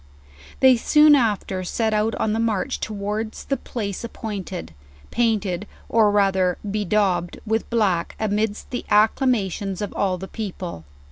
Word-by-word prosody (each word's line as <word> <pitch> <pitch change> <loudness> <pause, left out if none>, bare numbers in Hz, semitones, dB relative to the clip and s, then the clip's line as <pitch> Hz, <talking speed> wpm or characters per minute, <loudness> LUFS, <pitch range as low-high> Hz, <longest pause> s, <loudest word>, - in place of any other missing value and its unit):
They 260 -2 +7
goon 300 +5 +6
after 210 -7 +1
set 220 +4 -1
out 215 +1 +1
on 215 - 0
the 225 - 0
march 225 -4 0
towards 215 +1 -4
the 275 - 0
place 205 -5 -5
appointed, 200 - -6 0.4
painted 210 -5 0 0.2
or 220 -2 +4
rather 190 -3 +2
bedaubed 200 -4 0
with 220 0 -1
black, 195 -7 +1
amidst 215 0 -1
the 245 - -3
acclama 215 -1 +3
tions 195 0 -4
of 205 - -4
all 190 -2 0
the 190 +2 -7
people. 185 - -6
210 Hz, 140 wpm, -23 LUFS, 190-225 Hz, 0.4 s, They